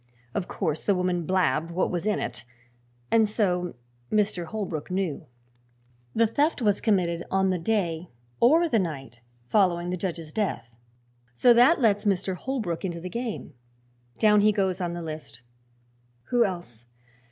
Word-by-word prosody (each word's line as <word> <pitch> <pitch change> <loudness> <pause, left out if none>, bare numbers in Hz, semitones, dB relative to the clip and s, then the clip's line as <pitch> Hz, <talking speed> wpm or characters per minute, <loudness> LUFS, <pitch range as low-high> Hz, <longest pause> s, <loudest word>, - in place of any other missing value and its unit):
Of 185 - -2
course 160 -6 -2
the 200 - +2
woman 180 -3 -1
blabbed 175 -3 +1
what 175 +2 0
was 175 +3 -2
in 210 - +2
it, - - -4 0.7
and 220 -2 +4
so 180 - 0 0.4
Mr. 205 -4 +1
Holbrook 185 -6 -4
knew. 185 -7 -2 0.9
The 230 - +4
theft 290 +9 +1
was 210 -4 +1
committed 175 -6 +1
on 190 0 +2
the 180 - -1
day 170 -3 -1 0.3
or 320 +8 +5
the 235 -8 +2
night 135 - -5 0.2
following 175 - +2
the 180 - -2
judge's 170 -4 -4
death, 185 - -2 0.6
so 240 - +5
that 245 +8 +5
lets 205 -2 +3
Mr. 190 -1 +1
Holbrook 210 -5 -3
into 175 -3 -3
the 180 +2 -6
game. 235 -9 -4 0.6
Down 210 -1 +5
he 215 +1 +5
goes 190 -2 0
on 175 -1 -2
the 175 0 -5
list. 155 -7 -8 0.9
Who 240 -1 +4
else? 145 - -6
185 Hz, 150 wpm, -26 LUFS, 170-215 Hz, 0.9 s, or